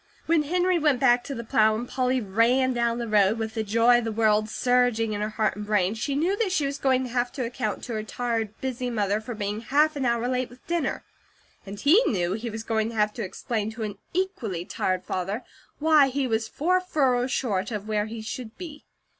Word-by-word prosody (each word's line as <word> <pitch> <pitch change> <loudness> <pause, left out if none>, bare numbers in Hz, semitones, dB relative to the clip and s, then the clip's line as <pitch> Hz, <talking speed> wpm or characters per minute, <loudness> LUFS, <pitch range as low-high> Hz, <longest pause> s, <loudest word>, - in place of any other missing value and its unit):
When 330 -1 +3
Henry 355 +3 +1
went 295 -5 +2
back 245 -2 +4
to 275 - -5
the 235 - -5
plow, 220 -1 +3
and 235 +3 -4
Polly 255 0 0
ran 240 +5 +2
down 235 -1 0
the 235 -1 -3
road, 210 0 +3
with 220 -1 -3
the 220 - -1
joy 230 +3 +4
of - - -4
the 225 - -2
world 215 -1 +2
surging 245 -2 +1
in 205 - -3
her 210 - -1
heart 215 -1 -1
and 210 - -5
brain, 205 -2 +2
she 275 +5 -2
knew 340 +7 +1
that 415 -4 0
she 310 -6 +1
was 280 +1 -3
going 260 -1 +2
to 255 - -5
have 245 0 0
to 255 - -3
account 245 +2 -3
to 240 - -5
her 215 - -2
tired, 225 -1 -3
busy 255 -1 -3
mother 210 -2 0
for 230 +2 -6
being 210 0 -3
half 300 +6 +2
an 275 -2 -2
hour 235 0 +1
late 255 0 -1
with 245 +1 -17
dinner; 335 -5 -1 0.6
and 200 +1 -7
he 330 +11 +6
knew 180 -4 0
he 230 +3 -4
was 220 0 -6
going 220 -1 0
to 230 - -8
have 210 -1 +1
to 230 - -4
explain 215 +3 -3
to 220 0 -6
an 205 -2 -5
equally 245 - -2
tired 185 0 -1
father 195 +6 -3 0.3
why 305 -2 +5
he 270 +1 -1
was 225 -2 0
four 365 +9 +1
furrows 265 -8 +1
short 205 -9 -1
of 210 -2 -5
where 210 -1 0
he 220 0 -7
should 225 0 -7
be. 315 -5 -9
235 Hz, 230 wpm, -26 LUFS, 215-265 Hz, 0.6 s, he